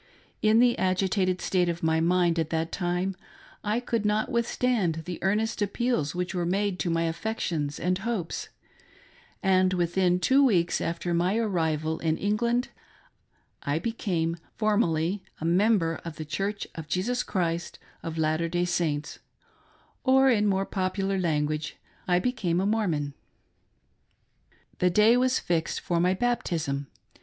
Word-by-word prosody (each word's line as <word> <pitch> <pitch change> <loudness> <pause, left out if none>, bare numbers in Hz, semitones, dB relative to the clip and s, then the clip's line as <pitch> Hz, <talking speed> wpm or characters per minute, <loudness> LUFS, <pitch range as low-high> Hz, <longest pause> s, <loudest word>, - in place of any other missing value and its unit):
In 215 +1 +4
the 240 0 +5
agitated 185 0 +1
state 180 -2 +1
of 170 0 -4
my 160 0 +2
mind 170 0 +2
at 160 -1 -1
that 165 0 -1
time, 180 +1 -1 0.5
I 215 +3 0
could 235 -3 -2
not 210 +4 0
withstand 235 -8 0
the 180 -1 -5
earnest 210 +4 0
appeals 205 - 0
which 180 +1 -2
were 175 -2 -1
made 195 +2 0
to 175 - -1
my 165 0 +1
affections 165 -4 -2
and 180 +1 0
hopes; 220 -5 -3 0.9
and 185 -1 +3
within 180 +1 +2
two 270 +8 +4
weeks 180 -10 +2
after 170 +1 -2
my 180 +5 +1
arrival 160 -7 0
in 160 -1 0
England, 235 +4 0 0.9
I 145 +2 -1
became 170 -4 -1 0.2
form 215 0 +2
ally 165 +3 0 0.2
a 160 - -4
member 175 -1 +2
of 165 -2 -6
the 155 0 -6
Church 195 +7 -3
of 160 -2 -7
Jesus 225 +11 0
Christ 170 -3 -2 0.2
of 165 -1 -5
Latter 160 +1 +1
day 175 +1 0
Saints; 165 -4 -1 0.8
or 265 0 +5
in 210 -3 +2
more 195 -1 +1
popular 195 0 -1
language 155 -3 -1 0.2
— - - -32
I 180 -1 +3
became 180 -5 0
a 190 - +1
Mormon. 175 -10 0 1.7
The 180 - +4
day 215 +6 +5
was 255 +1 +2
fixed 170 -2 -1
for 170 -1 -1
my 180 +2 +3
baptism. 170 - -1
180 Hz, 150 wpm, -27 LUFS, 165-210 Hz, 1.7 s, the